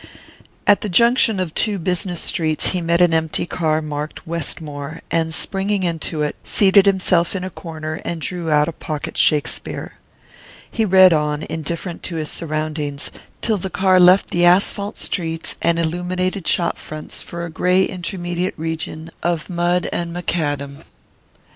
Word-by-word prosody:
At 205 Hz, -, +5 dB
the 210 Hz, -, -3 dB
junction 235 Hz, +1 st, +3 dB
of 175 Hz, -4 st, -3 dB
two 210 Hz, -3 st, +1 dB
business 180 Hz, 0 st, -1 dB
streets 155 Hz, -2 st, +1 dB
he 180 Hz, -, -1 dB
met 170 Hz, +1 st, +1 dB
an 175 Hz, -2 st, +4 dB
empty 160 Hz, 0 st, 0 dB
car 160 Hz, -3 st, -1 dB
marked 150 Hz, 0 st, -5 dB
"Westmore," 155 Hz, -2 st, -1 dB
and 160 Hz, -1 st, 0 dB
springing 195 Hz, +4 st, 0 dB
into 165 Hz, -2 st, -1 dB
it, 150 Hz, -, -2 dB
seated 200 Hz, 0 st, +5 dB
himself 185 Hz, -2 st, +2 dB
in 185 Hz, -, -3 dB
a 185 Hz, -, -5 dB
corner 155 Hz, -2 st, -6 dB
and 170 Hz, -, -4 dB
drew 170 Hz, +2 st, -3 dB
out 150 Hz, -1 st, +3 dB
a -, -, -2 dB
pocket 155 Hz, -2 st, -6 dB
Shakespeare. 150 Hz, -2 st, 0 dB, 0.7 s
He 225 Hz, -, 0 dB
read 185 Hz, -2 st, +7 dB
on, 150 Hz, -1 st, 0 dB
indifferent 165 Hz, +2 st, -5 dB
to 170 Hz, -, -5 dB
his 155 Hz, -2 st, -2 dB
surroundings, 155 Hz, -3 st, -3 dB, 0.3 s
till 220 Hz, -3 st, +1 dB
the 190 Hz, -, -3 dB
car 185 Hz, -1 st, +3 dB
left 180 Hz, +2 st, +5 dB
the 175 Hz, -, +1 dB
asphalt 200 Hz, +3 st, +3 dB
streets 165 Hz, -3 st, -2 dB
and 170 Hz, 0 st, +2 dB
illuminated 180 Hz, +2 st, -2 dB
shop 170 Hz, -1 st, +1 dB
fronts 155 Hz, 0 st, -5 dB
for 170 Hz, 0 st, -6 dB
a 170 Hz, -, -8 dB
grey 180 Hz, +3 st, +2 dB
intermediate 180 Hz, 0 st, -3 dB
region 160 Hz, 0 st, -5 dB
of 170 Hz, 0 st, -2 dB
mud 175 Hz, 0 st, +1 dB
and 170 Hz, -1 st, -3 dB
macadam. 145 Hz, -5 st, -3 dB
170 Hz, 155 wpm, -20 LUFS, 155-185 Hz, 0.7 s, read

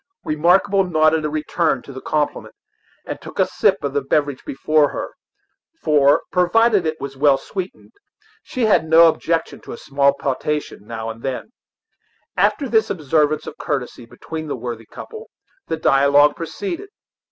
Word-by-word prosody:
Remarkable 185 Hz, +6 st, +3 dB
nodded 155 Hz, -3 st, +2 dB
a -, -, 0 dB
return 155 Hz, -2 st, -1 dB
to 140 Hz, -, -11 dB
the 130 Hz, -, -8 dB
compliment, 150 Hz, -1 st, -2 dB, 0.5 s
and -, -, -6 dB
took -, -, -11 dB
a -, -, +4 dB
sip -, -, +1 dB
of 140 Hz, -1 st, -2 dB
the 145 Hz, -, +1 dB
beverage 145 Hz, -1 st, -1 dB
before 150 Hz, +2 st, +1 dB
her; -, -, -5 dB, 0.7 s
for, 145 Hz, -2 st, +4 dB
provided 195 Hz, +1 st, +3 dB
it 155 Hz, 0 st, -3 dB
was 135 Hz, 0 st, -6 dB
well 140 Hz, 0 st, +4 dB
sweetened, 190 Hz, +4 st, -7 dB, 0.5 s
she 255 Hz, -, -4 dB
had 200 Hz, -7 st, +2 dB
no 165 Hz, +1 st, +8 dB
objection 165 Hz, 0 st, -1 dB
to -, -, -9 dB
a -, -, -8 dB
small 140 Hz, -1 st, +2 dB
potation 140 Hz, -5 st, -3 dB
now 115 Hz, -1 st, -5 dB
and 115 Hz, +1 st, -12 dB
then, 135 Hz, -, -4 dB, 0.8 s
After 280 Hz, -, +1 dB
this 220 Hz, -2 st, +2 dB
observance 155 Hz, -2 st, 0 dB
of -, -, -9 dB
courtesy 125 Hz, -4 st, -4 dB
between 160 Hz, +5 st, -7 dB
the 145 Hz, -, -3 dB
worthy 115 Hz, -2 st, -6 dB
couple, 450 Hz, 0 st, -10 dB, 0.4 s
the 160 Hz, -, -2 dB
dialogue 140 Hz, 0 st, +4 dB
proceeded. 345 Hz, -, -5 dB
155 Hz, 155 wpm, -20 LUFS, 140-170 Hz, 0.8 s, no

